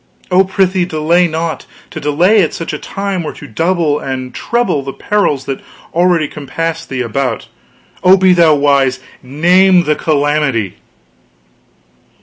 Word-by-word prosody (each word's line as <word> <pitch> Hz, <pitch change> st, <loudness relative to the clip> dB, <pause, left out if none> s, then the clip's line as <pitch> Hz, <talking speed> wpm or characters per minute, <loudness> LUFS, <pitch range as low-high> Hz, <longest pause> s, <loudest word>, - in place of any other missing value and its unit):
Oh, 185 Hz, +1 st, +5 dB
prithee 190 Hz, -1 st, 0 dB
delay 170 Hz, +2 st, +1 dB
not; 160 Hz, -1 st, -4 dB, 0.2 s
to -, -, -6 dB
delay 175 Hz, +9 st, +3 dB
at 165 Hz, -, -1 dB
such 165 Hz, -, -5 dB
a 150 Hz, -, -4 dB
time 195 Hz, -2 st, -4 dB
were 155 Hz, -, -5 dB
to -, -, -11 dB
double 165 Hz, -2 st, 0 dB
and 130 Hz, -1 st, -5 dB
treble 235 Hz, -11 st, -1 dB
the 135 Hz, 0 st, -6 dB
perils 150 Hz, -10 st, -1 dB
that 135 Hz, -, -4 dB, 0.3 s
already 175 Hz, -2 st, +2 dB
compass 165 Hz, +3 st, -5 dB
thee 130 Hz, -1 st, -4 dB
about. 125 Hz, 0 st, -2 dB, 0.6 s
Oh, 185 Hz, +1 st, +6 dB
be 185 Hz, -1 st, +4 dB
thou 165 Hz, -3 st, +4 dB
wise 140 Hz, -2 st, +2 dB, 0.2 s
name 175 Hz, +7 st, +3 dB
the 150 Hz, -2 st, +1 dB
calamity!" 145 Hz, -, 0 dB
160 Hz, 140 wpm, -14 LUFS, 140-180 Hz, 0.6 s, Oh